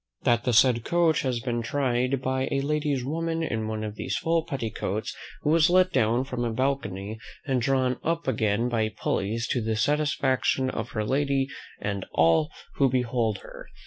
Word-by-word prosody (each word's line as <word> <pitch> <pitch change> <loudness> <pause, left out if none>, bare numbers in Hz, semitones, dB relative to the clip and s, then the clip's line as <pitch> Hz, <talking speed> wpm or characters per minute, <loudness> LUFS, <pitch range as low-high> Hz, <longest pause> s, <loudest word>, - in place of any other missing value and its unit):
"That 120 0 +2
the 125 - +2
said 120 0 +5
coach 170 0 +2
has 125 -3 -1
been 120 -1 -2
tried 130 +1 0
by 130 0 0
a 135 - +1
lady's 145 -3 -1
woman 165 +3 -1
in 110 -8 -2
one 110 0 -3
of 105 -1 -4
these - - -2
full 165 0 +1
petticoats, 110 - -3 0.3
who 150 - +2
was 165 +1 +5
let 185 +1 +4
down 120 0 +2
from 125 -2 -3
a 120 - -1
balcony, 110 -5 -2 0.3
and 130 -3 0
drawn 130 0 +1
up 165 -1 -1
again 110 -2 +1
by 110 -3 0
pulleys, 110 +2 -2
to 125 - 0
the - - -5
great - - -3
satisfaction 135 0 +1
of 115 - -5
her 110 -2 -1
lady, 135 +2 +1 0.3
and 100 -1 -3
all 80 -1 +4 0.3
who 135 - +4
behold 120 -4 0
her. - - -11
125 Hz, 180 wpm, -26 LUFS, 110-140 Hz, 0.3 s, said